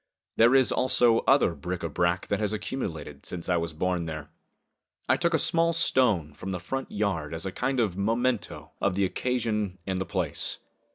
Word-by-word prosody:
There 120 Hz, +3 st, +5 dB
is, 130 Hz, -2 st, +4 dB
also, 120 Hz, -2 st, +3 dB
other 135 Hz, -10 st, +5 dB
bric 90 Hz, +4 st, -5 dB
a -, -, 0 dB
brac 85 Hz, +3 st, 0 dB
which 100 Hz, -, -1 dB
has 105 Hz, -1 st, -1 dB
accumulated 85 Hz, -, -5 dB
since 85 Hz, -2 st, -6 dB
I 90 Hz, -1 st, +2 dB
was 85 Hz, -1 st, -1 dB
born 85 Hz, +1 st, -1 dB
there. 75 Hz, -2 st, -6 dB, 0.8 s
I -, -, +5 dB
took 170 Hz, -1 st, +1 dB
a -, -, +5 dB
small 165 Hz, +1 st, +2 dB
stone 115 Hz, -, +2 dB
from 95 Hz, +6 st, -7 dB
the 90 Hz, -, -3 dB
front 135 Hz, +10 st, -4 dB
yard 85 Hz, -7 st, -1 dB
as 80 Hz, -, -4 dB
a 95 Hz, -, -2 dB
kind 130 Hz, +5 st, -1 dB
of 105 Hz, -7 st, +1 dB
memento 115 Hz, +4 st, -1 dB
of 95 Hz, -2 st, +1 dB
the 100 Hz, 0 st, +2 dB
occasion 105 Hz, -3 st, -1 dB
and 95 Hz, -1 st, -2 dB
the 95 Hz, -, -2 dB
place. 85 Hz, -8 st, -2 dB
100 Hz, 190 wpm, -27 LUFS, 85-125 Hz, 0.8 s, There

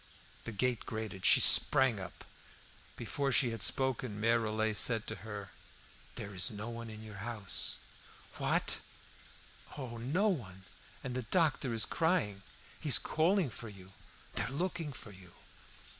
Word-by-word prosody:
The 115 Hz, -, -4 dB
gate 120 Hz, +2 st, 0 dB
grated; 110 Hz, -4 st, -3 dB
she -, -, +8 dB
sprang 130 Hz, -6 st, +5 dB
up. 95 Hz, -3 st, -9 dB, 0.7 s
Before 135 Hz, +4 st, -2 dB
she 125 Hz, -1 st, +3 dB
had 115 Hz, -3 st, -5 dB
spoken 130 Hz, -4 st, +2 dB
Mere 115 Hz, +2 st, +3 dB
Rollet 110 Hz, -1 st, -1 dB
said 115 Hz, +1 st, +5 dB
to 110 Hz, -, -5 dB
her 105 Hz, -3 st, -8 dB, 0.6 s
"There 100 Hz, 0 st, -6 dB
is 90 Hz, -2 st, +3 dB
no 105 Hz, +2 st, -5 dB
one 115 Hz, 0 st, -7 dB
at 110 Hz, -, -8 dB
your 110 Hz, -1 st, -10 dB
house!" 105 Hz, -3 st, -1 dB, 0.6 s
"What?" -, -, 0 dB, 1.0 s
"Oh, 125 Hz, -4 st, -6 dB
no 150 Hz, -, +1 dB
one! 100 Hz, -, -3 dB, 0.4 s
And 125 Hz, -, -4 dB
the 130 Hz, -, -2 dB
doctor 140 Hz, +1 st, +1 dB
is 115 Hz, -2 st, +1 dB
crying. 160 Hz, -, 0 dB, 0.4 s
He 155 Hz, -, -4 dB
is 130 Hz, -, +7 dB
calling 170 Hz, -, +1 dB
for 115 Hz, +1 st, -8 dB
you; 95 Hz, -2 st, -13 dB, 0.4 s
they're -, -, -1 dB
looking 165 Hz, +2 st, -3 dB
for 115 Hz, -4 st, -9 dB
you." 95 Hz, -2 st, -15 dB
115 Hz, 150 wpm, -33 LUFS, 105-130 Hz, 1.0 s, she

